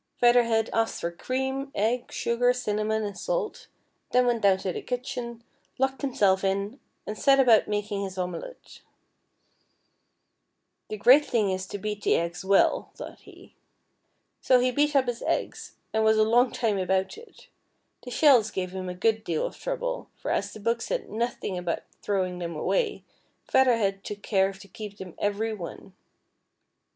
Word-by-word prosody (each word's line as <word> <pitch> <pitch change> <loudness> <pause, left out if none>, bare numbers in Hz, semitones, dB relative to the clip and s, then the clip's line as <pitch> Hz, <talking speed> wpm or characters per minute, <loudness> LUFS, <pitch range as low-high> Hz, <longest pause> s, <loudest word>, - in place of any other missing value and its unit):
Feather 245 0 +6
Head 225 -1 +1
asked 225 0 0
for 170 - -2
cream, 265 +8 -3
eggs, 235 +4 -1
sugar, 245 +1 +2
cinnamon, 220 -2 -1
and 205 -1 -4
salt, - - -3 0.4
then 250 0 +4
went 240 -2 +1
down 195 -2 +4
to 190 -1 -3
the - - -5
kitchen, 245 -2 -5 0.3
locked 265 +1 0
himself 200 -9 +2
in, 200 +6 -1 0.3
and 210 - -4
set 275 +5 +4
about 240 -5 +5
making 205 -1 -2
his 190 -1 -5
omelet. 180 - -6 1.1
" - - -50
The 215 - -4
great 255 +8 +7
thing 215 -5 +1
is 190 0 -3
to 205 - -5
beat 210 +1 -4
the - - +3
eggs 170 +1 -2
well," 195 +1 +3
thought - - -9
he. - - -16 0.9
So 255 -1 +5
he 250 +1 +2
beat 290 +3 +1
up 270 -2 +4
his 245 -1 -3
eggs, - - -3 0.2
and 220 0 +2
was 220 0 +4
a 215 - +5
long 240 +3 +3
time 215 -5 0
about 190 +1 0
it. 460 +2 -16 0.5
The 250 - -9
shells 250 -4 +5
gave 185 -3 -4
him 185 -1 -5
a 180 - -5
good 220 +3 +1
deal 165 -6 -1
of - - -5
trouble, - - -4
for - - -4
as - - -1
the - - -10
book 230 +2 0
said - - -3
nothing 220 -4 -2
about 175 -1 -3 0.2
throwing 185 -3 -1
them 170 -2 -4
away. 450 - -1 0.4
Feather 255 -3 +4
Head 195 -2 -1
took 205 0 -7
care 195 -2 +2
to 195 +1 -14
keep 210 -1 -9
them 185 -4 -9
every 210 +2 -1
one. 185 -1 -8
220 Hz, 175 wpm, -27 LUFS, 195-250 Hz, 1.1 s, great